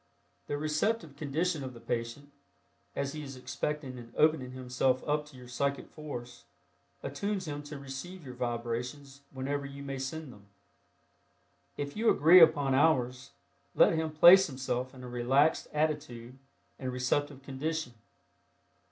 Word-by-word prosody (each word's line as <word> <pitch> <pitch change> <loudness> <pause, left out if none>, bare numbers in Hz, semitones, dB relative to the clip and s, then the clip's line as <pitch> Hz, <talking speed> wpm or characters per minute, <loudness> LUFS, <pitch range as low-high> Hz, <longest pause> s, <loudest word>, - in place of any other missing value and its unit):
The 145 - -2
receptive 155 +2 -1
condition 155 +2 -1
of 130 -1 -7
the - - -10
patient, 120 +5 -4 0.6
as 140 0 -2
he 155 - -5
is 135 -2 -8
expecting 130 0 -4
and 115 -1 -12
opening 155 -5 +3
himself 130 0 0
up 150 0 0
to 145 -3 -14
your 125 -1 -12
psychic 140 +3 -2
force, 135 -6 -8 0.6
attunes 190 +6 -3
him 145 -1 -4
to 145 0 -8
receive 140 +6 -8
your 130 - -7
vibrations 125 +3 -4
whenever 140 +2 -3
you 140 0 -9
may 135 -1 -5
send 135 +1 -5
them. 100 -1 -18 1.3
If 145 0 -4
you 225 +2 +3
agree 165 +5 +7
upon 150 -5 +5
hours, 130 -2 +2 0.5
let - - +6
him 160 -1 0
place 175 +5 +8
himself 130 -2 -3
in 125 - -11
a - - -7
relaxed 130 +6 +2
attitude 150 -6 -2 0.4
and 130 -1 -3
receptive 135 +2 -1
condition. 145 0 -3
140 Hz, 145 wpm, -31 LUFS, 130-155 Hz, 1.3 s, place